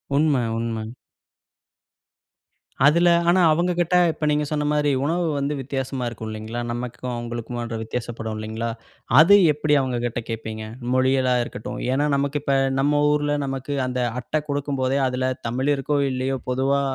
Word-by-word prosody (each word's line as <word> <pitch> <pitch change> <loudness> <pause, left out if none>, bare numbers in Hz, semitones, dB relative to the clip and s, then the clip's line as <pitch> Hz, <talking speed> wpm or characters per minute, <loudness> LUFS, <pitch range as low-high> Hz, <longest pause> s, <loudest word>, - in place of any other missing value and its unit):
உண்ம, 150 0 +3 0.2
உண்ம. 115 -1 -3 2.0
அதில, 170 +4 +5 0.2
ஆனா 185 +1 +4
அவங்க 175 +3 +2
கிட்ட 175 +1 +1 0.2
இப்போ 155 -1 -4
நீங்க 150 0 +1
சொன்ன 150 -1 -1
மாரி 150 -1 +2
உணவு 170 +3 0
வந்து 140 +1 -1
வித்தியாசமா 135 -1 -3
இருக்கும் 110 -2 -6
இல்லைங்களா, 110 +2 -5
நமக்கும் 125 +1 -5
அவுங்களுக்குமான்ற 120 0 -5
வித்தியாசப்படும் 115 -1 -5
இல்லைங்களா? 110 +2 -4 0.5
அது 185 +6 +8 0.2
எப்படி 150 0 0
அவுங்ககிட்ட 120 -2 -2
கேப்பீங்க? 110 -1 -5 0.3
மொழிகளா 130 0 +2
இருக்கட்டும். 110 - -7
ஏன்னா, 145 +3 +1
நமக்கு 140 +1 0
இப்ப 140 -1 +1 0.2
நம்ம 145 +2 +2
ஊர்ல 145 0 +1
நமக்கு 135 +1 -4
அந்த 125 0 -2 0.2
அட்டை 155 +5 -2
குடுக்கும்போதே, 140 -2 0
அதில 130 0 -1 0.2
தமிழ் 130 +5 0
இருக்கோ, 140 +2 -1
இல்லையோ, 130 +1 -1
பொதுவா 135 +2 +1
130 Hz, 140 wpm, -23 LUFS, 120-145 Hz, 2.0 s, அது